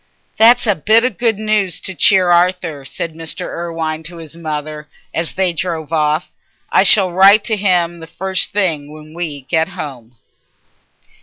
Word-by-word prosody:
"That's 240 +3 +5
a 210 - +3
bit 220 +7 +3
of 255 - -3
good 230 -3 +1
news 215 -4 0
to 190 - -3
cheer 180 +2 +4
Arthur," 175 -4 +1
said 160 +4 -5
Mr. 160 0 -5
Irwine 165 -2 -4
to 170 +1 -7
his 165 -1 -11
mother, 155 -2 -6 0.2
as 165 0 -2
they 185 -2 0
drove 165 -2 -4
off. 155 +1 0 0.4
"I - - +4
shall 195 -4 +4
write 195 +4 +6
to 220 - 0
him 175 -4 0
the 165 - -10
first 190 +1 0
thing 160 -8 -1
when 155 0 -13
we 160 -4 -5
get 160 +4 0
home." 125 -6 -9
170 Hz, 165 wpm, -16 LUFS, 155-190 Hz, 0.4 s, write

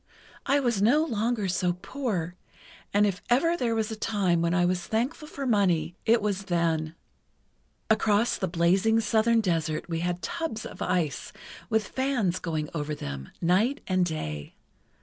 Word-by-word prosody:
I 280 +1 +4
was 240 -7 0
no 285 +9 +4
longer 225 -4 -1
so 180 -1 +1
poor, 185 -3 -3 0.6
and 205 +1 +4
if 195 -2 -1
ever 330 +8 +3
there 240 -7 0
was 220 0 -1
a - - -3
time 195 -6 +1
when 170 0 +1
I 175 -1 +3
was 180 0 -1
thankful 255 +8 -1
for 280 -2 -5
money 180 -8 +2
it 225 -1 +4
was 200 -2 -1
then. 165 -3 0 0.9
Across 220 +1 +2
the 190 - -1
blazing 185 +6 +3
southern 225 +1 +3
desert 165 -5 -1
we 165 -2 -2
had 175 +1 -2
tubs 325 -10 -3
of - - -9
ice, 160 -7 -1 0.4
with 220 -2 +1
fans 250 -9 0
going 155 -3 -2
over 150 -1 -3
them, 70 - -6
night 210 +12 +2
and 185 -1 +2
day. 75 - -4
195 Hz, 160 wpm, -27 LUFS, 170-225 Hz, 0.9 s, I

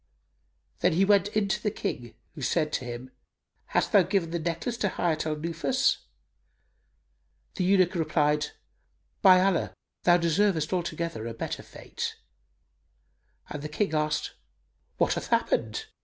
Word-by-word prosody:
Then - - +3
he 190 +4 +3
went 200 0 +4
in 210 -1 0
to 190 - 0
the 210 - +1
King 120 - -5 0.2
who 155 - -9
said 150 +3 0
to 130 - -2
him 120 +2 -7 0.5
"Hast - - 0
thou 200 - +7
given 180 -2 0
the 170 - -1
necklace 170 +8 -2
to 205 - 0
Hayat 160 -4 -1
al 155 - 0
Nufus?" 170 - +1 1.6
The 185 - -2
eunuch 185 -1 +4
replied, 155 -3 +1 0.7
"By 185 -3 +8
Allah, 190 -2 +1 0.3
thou 175 0 +5
deservest 170 -1 +1
altogether 170 -8 -2
a 115 - -6
better - - -4
fate;" - - -6 1.4
and 150 - -5
the 150 - -5
King 200 -2 -1
asked, 150 0 0 0.6
"What - - +2
hath - - -4
happened? 440 - 0
170 Hz, 140 wpm, -27 LUFS, 150-195 Hz, 1.6 s, By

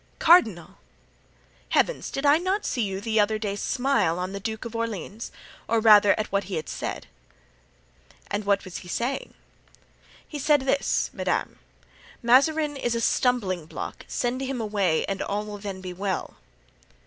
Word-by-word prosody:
"Cardinal!" 230 - +4 0.9
"Heavens! - - +1
did 275 - -3
I 290 +2 +6
not 380 +4 -1
see 245 - -1
you 195 -3 -2
the 220 +1 0
other 215 +1 +2
day 205 -2 -3
smile 245 -6 +1
on 180 +1 -3
the 200 - -4
Duke 220 +2 -5
of 230 0 -7
Orleans? 225 -1 -4 0.4
or 230 0 +2
rather 210 -2 +6
at 215 - -3
what 200 0 0
he 180 -4 -2
said?" - - -5 1.3
"And 205 +1 -1
what 200 0 +1
was 185 - -7
he 180 - -10
saying?" 245 +9 -3 0.9
"He 295 - -6
said 290 +1 +3
this, 275 +1 0
madame: - - -2 0.6
'Mazarin 290 +5 +3
is 240 -3 -1
a - - 0
stumbling 205 -9 +1
block. - - -7
Send 245 +1 -2
him 265 -1 -3
away 200 -7 +1
and 195 - -3
all 205 +1 -2
will 210 -1 -7
then 195 -2 -6
be 185 -1 -6
well. 190 +1 -3
220 Hz, 160 wpm, -25 LUFS, 200-260 Hz, 1.3 s, I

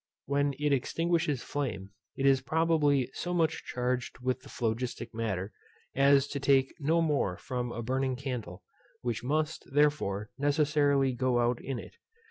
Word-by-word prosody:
When 140 0 +1
it 150 0 +1
extinguishes 160 0 0
flame, 100 -9 -3 0.2
it 135 - -1
is 135 -1 +5
probably 145 -3 +2
so 175 0 -3
much 165 -2 +1
charged 125 0 -2
with 130 0 -1
the - - -14
phlogistic 120 +1 -3
matter, 105 -3 -3 0.4
as 140 0 +5
to 140 - -3
take 135 -1 +3
no 160 +3 +2
more 140 - 0
from 125 -2 -4
a 115 - -4
burning 130 +2 0
candle, 125 -9 -5 0.4
which 120 -2 -2
must, 155 +4 -1
therefore, 140 -9 +1
necessarily 145 -2 +2
go 125 0 +1
out 120 0 +1
in 135 -2 -3
it. - - -10
135 Hz, 150 wpm, -30 LUFS, 120-145 Hz, 0.4 s, is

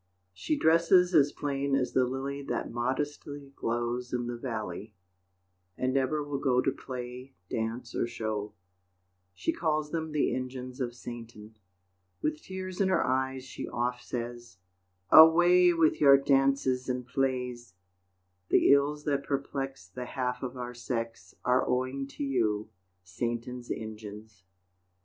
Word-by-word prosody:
She 300 - -1
dresses 170 - +4
as 145 -3 +5
plain 140 -1 -1
as 130 -2 0
the 130 - +4
lily 135 +2 -3
That 140 - -3
modestly 140 +3 -3
glows 120 +1 -2
in 120 -1 -1
the 120 0 -3
valley, 110 -4 -5 0.8
And 130 0 0
never 135 +3 +1
will 145 -1 -3
go 125 -3 +2
To 135 - +2
play, 125 0 -7 0.2
dance 115 +2 -3
or - - 0
show 110 -3 -4 0.8
She 90 - -1
calls 155 -2 -1
them 160 -1 -2
the 150 -1 +1
engines 130 0 -5
of 120 -1 -2
Satan. 115 -3 -9 0.6
With 150 +8 -2
tears 185 0 -5
in 190 - +3
her 185 - +2
eyes 130 0 0
she 130 - -7
oft 125 +1 -2
says, 120 -2 -6 0.5
"Away 175 +3 +8
with 165 -2 +2
your 140 -2 +8
dances 135 -2 +2
and 125 -1 -2
plays! 125 -4 -2 0.7
The - - +5
ills 145 +1 +2
that 140 -2 0
perplex 135 -7 -3
The 125 +8 -7
half 125 0 -3
of 130 0 -5
our 125 0 -5
sex 115 -1 -5
Are 125 +1 +4
owing 130 +2 -1
to 140 - -6
you, 110 -6 0 0.3
Satan's 120 +6 -4
engines." 105 -3 -7
130 Hz, 140 wpm, -29 LUFS, 120-140 Hz, 0.8 s, Away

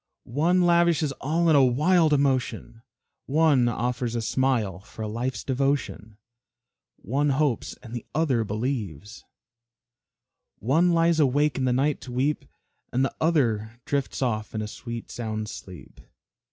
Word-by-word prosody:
One 170 +8 +2
lavishes 170 -4 +3
all 165 +5 +1
in 160 - +5
a 140 - +6
wild 155 +6 +3
emotion, 135 -5 0 0.5
One 145 -4 +3
offers 120 0 -2
a 115 - -1
smile 115 -8 0
for 105 +3 -9
a - - -3
life's 120 +4 -3
devotion, 130 -5 -2 0.8
One 140 +7 -1
hopes 140 -3 0
and 115 -2 -10
the 120 - -5
other 140 -8 +2
believes, 105 - -4 1.3
One 160 - +2
lies 165 -1 +3
awake 145 0 +2
in 130 - 0
the 125 - +2
night 140 +3 +1
to 125 - -9
weep, 135 +5 -1 0.5
And 130 +2 +2
the - - -3
other 120 -8 +1
drifts 140 -1 -2
off 110 -3 -2
in 110 - -2
a - - -4
sweet 115 +1 -7
sound 110 -2 -4
sleep. 90 -2 -11
130 Hz, 140 wpm, -25 LUFS, 115-150 Hz, 1.3 s, a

